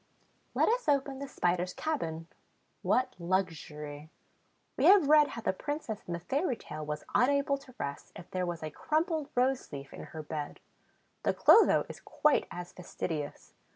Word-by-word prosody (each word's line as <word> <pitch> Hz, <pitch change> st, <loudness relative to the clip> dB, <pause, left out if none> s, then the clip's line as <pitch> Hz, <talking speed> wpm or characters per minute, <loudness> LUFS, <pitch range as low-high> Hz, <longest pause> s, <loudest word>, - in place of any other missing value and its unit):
Let -, -, +4 dB
us 475 Hz, -6 st, +1 dB
open 275 Hz, -1 st, +1 dB
the 280 Hz, -, -5 dB
Spider's 180 Hz, -5 st, 0 dB
cabin. 165 Hz, -, -2 dB, 0.6 s
What 255 Hz, +1 st, +1 dB
luxury! 155 Hz, -5 st, -3 dB, 0.7 s
We -, -, +1 dB
have 385 Hz, -6 st, +7 dB
read 300 Hz, 0 st, +7 dB
how 230 Hz, -, -6 dB
the -, -, 0 dB
Princess 290 Hz, -1 st, -4 dB
in 175 Hz, -, -3 dB
the 170 Hz, -, -3 dB
fairy 270 Hz, -, 0 dB
tale 155 Hz, 0 st, -7 dB
was 150 Hz, 0 st, -4 dB
unable 280 Hz, +2 st, +3 dB
to 260 Hz, -3 st, -16 dB
rest, 140 Hz, 0 st, -5 dB
if 175 Hz, -, -11 dB
there 185 Hz, -1 st, -1 dB
was 170 Hz, -2 st, -4 dB
a 155 Hz, -, -4 dB
crumpled 310 Hz, -, -1 dB
rose 255 Hz, +1 st, +1 dB
leaf 140 Hz, -2 st, -8 dB
in -, -, -8 dB
her 160 Hz, -1 st, -8 dB
bed. 150 Hz, -1 st, -5 dB, 0.6 s
The -, -, +1 dB
Clotho 450 Hz, -, +6 dB
is -, -, -9 dB
quite 300 Hz, -1 st, +2 dB
as 175 Hz, 0 st, -7 dB
fastidious. 160 Hz, -4 st, -5 dB
190 Hz, 165 wpm, -31 LUFS, -, 0.7 s, have